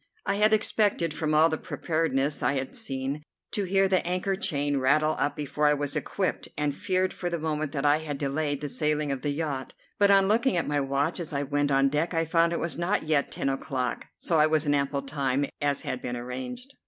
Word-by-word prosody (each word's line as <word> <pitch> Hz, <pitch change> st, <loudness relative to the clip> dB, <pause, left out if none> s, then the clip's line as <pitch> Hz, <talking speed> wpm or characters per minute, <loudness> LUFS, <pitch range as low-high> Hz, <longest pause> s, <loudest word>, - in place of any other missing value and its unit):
I 200 Hz, -, 0 dB
had 215 Hz, +1 st, +4 dB
expected, 210 Hz, -6 st, +2 dB
from 155 Hz, 0 st, -1 dB
all 155 Hz, +1 st, +6 dB
the 155 Hz, -1 st, -2 dB
preparedness 155 Hz, -3 st, -1 dB
I -, -, +2 dB
had 135 Hz, -1 st, -3 dB
seen, 135 Hz, +2 st, -3 dB, 0.3 s
to 205 Hz, -3 st, -1 dB
hear 195 Hz, +1 st, +3 dB
the 190 Hz, -1 st, +2 dB
anchor 185 Hz, +2 st, -1 dB
chain 145 Hz, -7 st, 0 dB
rattle 155 Hz, +4 st, +3 dB
up 145 Hz, -, 0 dB
before 150 Hz, 0 st, 0 dB
I 150 Hz, -, +4 dB
was 145 Hz, -1 st, -1 dB
equipped, 190 Hz, -2 st, -2 dB
and 145 Hz, -1 st, 0 dB
feared 185 Hz, +1 st, 0 dB
for 175 Hz, -, -3 dB
the 170 Hz, -, -2 dB
moment 155 Hz, -2 st, -2 dB
that 140 Hz, -1 st, -2 dB
I 145 Hz, +1 st, +5 dB
had 150 Hz, -3 st, -4 dB
delayed 145 Hz, 0 st, -1 dB
the 150 Hz, -, -3 dB
sailing 150 Hz, 0 st, 0 dB
of 135 Hz, -2 st, -3 dB
the 145 Hz, -, -1 dB
yacht; 145 Hz, -3 st, -3 dB, 0.2 s
but 200 Hz, -1 st, +5 dB
on 195 Hz, -1 st, +5 dB
looking 230 Hz, +1 st, +2 dB
at 170 Hz, -, 0 dB
my 145 Hz, 0 st, +1 dB
watch 140 Hz, +5 st, 0 dB
as 165 Hz, -2 st, -5 dB
I 140 Hz, 0 st, 0 dB
went 145 Hz, +1 st, 0 dB
on 135 Hz, 0 st, +4 dB
deck 155 Hz, +5 st, -1 dB
I 165 Hz, 0 st, +2 dB
found 165 Hz, +1 st, +3 dB
it 170 Hz, -, 0 dB
was 170 Hz, 0 st, -2 dB
not 175 Hz, +4 st, 0 dB
yet 155 Hz, -3 st, +1 dB
ten -, -, -2 dB
o'clock, 130 Hz, -2 st, -2 dB
so 165 Hz, -2 st, +1 dB
I 155 Hz, -, +6 dB
was 155 Hz, 0 st, +1 dB
in 145 Hz, -, +2 dB
ample 140 Hz, 0 st, 0 dB
time, 140 Hz, -1 st, 0 dB, 0.2 s
as 145 Hz, -1 st, 0 dB
had -, -, -3 dB
been 125 Hz, -1 st, -4 dB
arranged. 130 Hz, -, -6 dB
150 Hz, 230 wpm, -27 LUFS, 140-170 Hz, 0.3 s, all